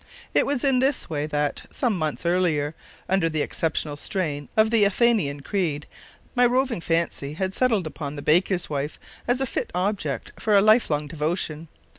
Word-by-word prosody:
It - - +3
was 280 -3 -1
in 270 -3 +3
this 265 - 0
way 150 -1 -1
that, 150 -1 -1
some 240 -6 0
months 155 -1 -3
earlier, 165 -4 +1 0.3
under 190 -3 +2
the 155 -2 0
exceptional 155 -2 -2
strain 145 -3 -3
of 220 +1 +4
the 225 -3 +4
Athanasian 200 -9 +2
Creed, 155 -4 -1 0.5
my 245 - +3
roving 250 -4 +2
fancy 165 -4 -1
had 190 +3 -2
settled 225 -7 +2
upon 150 -2 -5
the 145 - -7
baker's 180 +3 +2
wife 145 0 -3 0.3
as 245 +1 +2
a - - +2
fit - - -3
object 180 - -2
for 215 -2 +3
a - - +8
life 215 +3 +5
long 150 -1 0
devotion. 155 +1 -2
170 Hz, 175 wpm, -24 LUFS, 150-215 Hz, 0.5 s, a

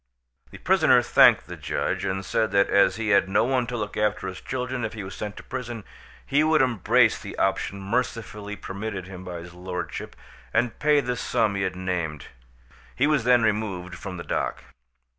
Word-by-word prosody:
The - - -11
prisoner - - +4
thanked - - +6
the - - -8
judge, - - -2
and 95 0 -2
said 110 - +1
that 100 0 +3
as 100 - +4
he 110 -1 -2
had 100 -2 +4
no 95 - +3
one 125 0 +1
to 120 +1 -3
look 105 -2 -4
after 105 -2 0
his 95 0 -7
children 125 -1 -3
if - - -3
he 110 -2 -6
was 95 - -7
sent 105 -1 -6
to - - -9
prison, 120 -4 -6 0.4
he 145 +2 +3
would 155 0 +4
embrace 120 -8 +3
the - - -8
option 95 0 0
mercifully 105 -1 -3
permitted 100 -1 -5
him 95 -1 -9
by 90 -2 -6
his 85 +1 -11
lordship, 90 0 -6 0.4
and 120 -2 +1
pay 150 -1 +4
the 125 -2 -2
sum 110 -3 0
he 100 - -2
had 95 - -1
named. 85 -6 -3 0.7
He 135 - +2
was 150 -5 +2
then 125 -2 +5
removed 100 -5 -1
from 90 +1 -7
the 85 - -6
dock. - - -2
105 Hz, 195 wpm, -25 LUFS, 95-120 Hz, 0.7 s, thanked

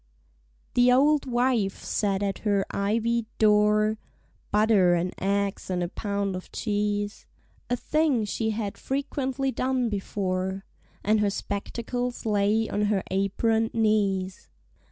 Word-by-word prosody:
THE 245 0 +5
auld 285 +3 +4
wife 240 -5 0
sat 200 -2 0
at 195 -1 -2
her 200 -2 +1
ivied 225 +3 0
door, 215 0 +3 0.5
(Butter 210 -4 +4
and 175 +1 -1
eggs 200 0 -1
and 180 -1 0
a 175 - -3
pound 200 -1 -2
of 185 - -8
cheese) 205 -1 -2 0.4
A 245 - +2
thing 300 -6 +1
she 220 +2 -2
had 215 -2 -3
frequently 270 -1 -2
done 255 -2 0
before; 190 -2 -2 0.4
And 215 +1 +3
her 210 -1 +2
spectacles 235 +5 -4
lay 210 +1 +2
on 210 0 0
her 205 -2 +1
apron'd 220 +4 +1
knees. 200 -4 0
210 Hz, 125 wpm, -26 LUFS, 200-235 Hz, 0.5 s, THE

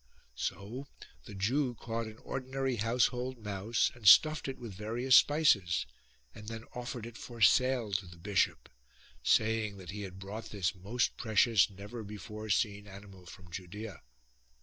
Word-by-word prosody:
So 115 - -5 0.4
the 105 - -9
Jew 125 +6 0
caught 115 0 -4
an 110 0 -10
ordinary 130 -1 -2
household 125 +3 0
mouse 105 +1 0
and 120 -4 -4
stuffed 155 +7 +7
it 135 - -4
with 115 -4 -8
various 115 +6 +2
spices, 110 - +4 0.5
and 105 - -11
then 115 0 -6
offered 120 -2 -5
it 120 0 -9
for 120 -1 -9
sale 125 -1 +4
to 95 -1 -1
the 85 -1 -13
bishop, 95 +3 0 0.5
saying 110 - +2
that 95 -2 -8
he 105 +1 -6
had 95 -2 -7
brought 100 +4 -7
this 95 -3 -1
most 100 +6 -1
precious 110 -2 +3
never 100 +4 -8
before 105 +1 -8
seen 100 -1 0
animal 100 -2 -12
from 90 +1 -13
Judea. 95 +4 -7
110 Hz, 150 wpm, -32 LUFS, 100-120 Hz, 0.5 s, stuffed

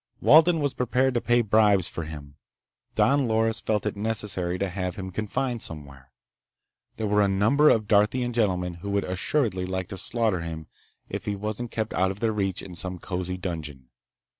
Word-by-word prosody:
Walden 160 +1 +6
was 145 -2 0
prepared 125 +1 +1
to 120 - 0
pay 120 0 +3
bribes 105 -4 +3
for 85 - -5
him. 75 -3 -9 0.6
Don 140 0 +3
Loris 110 0 +1
felt 105 -1 -1
it 105 - -1
necessary 100 -4 -1
to 100 - -1
have 90 -1 -4
him 95 -1 -6
confined 115 +5 -2
somewhere. 70 -4 -7 0.9
There 110 - -2
were 105 0 +2
a 100 - +4
number 110 +11 +4
of 110 -2 +2
Darthian 115 +4 +2
gentlemen 90 -6 0
who 100 - -5
would 100 0 0
assuredly 95 0 -1
like 95 -1 -3
to 95 - -6
slaughter 110 -2 -1
him 80 -1 -6 0.4
if - - -5
he 105 - -1
wasn't 110 +4 -4
kept 110 -1 -3
out 95 +1 +2
of 95 +1 -6
their 110 -1 0
reach 95 -3 -2
in 95 - -9
some 90 +2 -2
cozy 90 +1 -4
dungeon. 75 -8 -6
100 Hz, 185 wpm, -26 LUFS, 90-115 Hz, 0.9 s, Walden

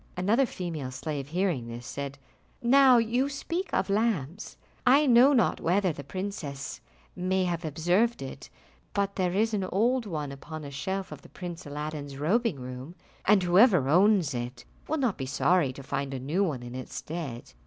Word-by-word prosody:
Another 220 +9 +3
female 165 - -5
slave 140 +1 -4
hearing 170 -7 -1
this, 120 +1 -7
said, 140 +2 -5 0.4
"Now 260 +1 +6
you 240 +4 +1
speak 335 +7 -4
of - - +1
lamps, 200 - -1 0.3
I 280 +4 +5
know 250 +1 +7
not 255 -5 +2
whether 185 +1 +2
the 145 - -8
princess 150 -5 -5 0.3
may 185 +1 0
have 175 -1 -2
observed 175 +7 +1
it, 135 - -8 0.4
but 200 0 0
there 180 -2 0
is 220 +3 +1
an 200 -2 0
old 230 +5 +1
one 150 -6 -3
upon 155 +3 -8
a 140 - -7
shelf 190 +7 -3
of - - -8
the - - -16
Prince 175 -3 -7
Aladdin's 145 -1 -5
robing 190 - +1
room, 130 +6 -8 0.3
and 200 -2 +5
whoever 180 - +5
owns 185 -2 +4
it 120 0 -5 0.2
will 315 - 0
not 250 - 0
be 130 - -3
sorry 150 +1 +2
to 135 +1 -10
find 135 +1 -3
a - - -4
new 155 +10 0
one 145 -10 -2
in 120 0 -8
its 130 -1 -7
stead. 145 -7 -6
175 Hz, 175 wpm, -28 LUFS, 140-210 Hz, 0.4 s, know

